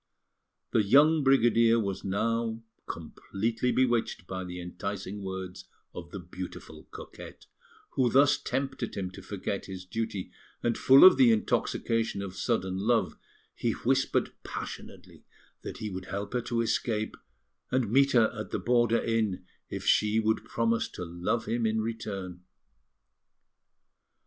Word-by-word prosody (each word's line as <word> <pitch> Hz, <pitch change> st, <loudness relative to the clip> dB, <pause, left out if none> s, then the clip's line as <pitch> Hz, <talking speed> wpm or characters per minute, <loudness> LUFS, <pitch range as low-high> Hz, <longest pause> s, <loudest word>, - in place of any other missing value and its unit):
The 110 Hz, -, +4 dB
young 145 Hz, +8 st, +5 dB
brigadier 115 Hz, -3 st, +4 dB
was 100 Hz, -3 st, -3 dB
now 115 Hz, +3 st, -1 dB, 0.2 s
completely 115 Hz, +4 st, -3 dB
bewitched 120 Hz, -7 st, +1 dB
by 95 Hz, +1 st, -5 dB
the 90 Hz, 0 st, -7 dB
enticing 100 Hz, +3 st, -5 dB
words 95 Hz, -1 st, -6 dB, 0.3 s
of 85 Hz, -1 st, -8 dB
the 100 Hz, -, -7 dB
beautiful 90 Hz, 0 st, -9 dB
coquette, -, -, -11 dB, 0.5 s
who 125 Hz, -2 st, +2 dB
thus 140 Hz, +3 st, +4 dB
tempted 135 Hz, -3 st, -3 dB
him 95 Hz, -2 st, -3 dB
to 95 Hz, -, -10 dB
forget 100 Hz, +1 st, -4 dB
his 95 Hz, -1 st, -7 dB
duty; 110 Hz, -1 st, -4 dB, 0.3 s
and 120 Hz, -1 st, +1 dB
full 135 Hz, +1 st, +7 dB
of 185 Hz, -, +9 dB
the 130 Hz, -3 st, +6 dB
intoxication 115 Hz, -1 st, 0 dB
of 95 Hz, -2 st, -7 dB
sudden 95 Hz, -1 st, -1 dB
love, 110 Hz, -1 st, +1 dB, 0.4 s
he 115 Hz, -, -1 dB
whispered 130 Hz, +2 st, 0 dB
passionately -, -, -8 dB, 0.4 s
that -, -, -7 dB
he 105 Hz, -1 st, -5 dB
would 95 Hz, 0 st, -6 dB
help 100 Hz, +2 st, -5 dB
her 125 Hz, -, 0 dB
to 115 Hz, 0 st, -1 dB
escape, 110 Hz, -1 st, -1 dB, 0.5 s
and 125 Hz, -5 st, 0 dB
meet 140 Hz, +2 st, +4 dB
her 115 Hz, -3 st, +4 dB
at 110 Hz, -, -6 dB
the -, -, -2 dB
border 120 Hz, -1 st, +2 dB
inn, 110 Hz, -5 st, -1 dB, 0.2 s
if -, -, -5 dB
she 105 Hz, +1 st, +3 dB
would 110 Hz, 0 st, +1 dB
promise 115 Hz, 0 st, 0 dB
to 90 Hz, -, -7 dB
love 85 Hz, +7 st, -2 dB
him 115 Hz, 0 st, 0 dB
in 110 Hz, 0 st, 0 dB
return. 100 Hz, -5 st, -5 dB
110 Hz, 140 wpm, -29 LUFS, 95-120 Hz, 0.5 s, of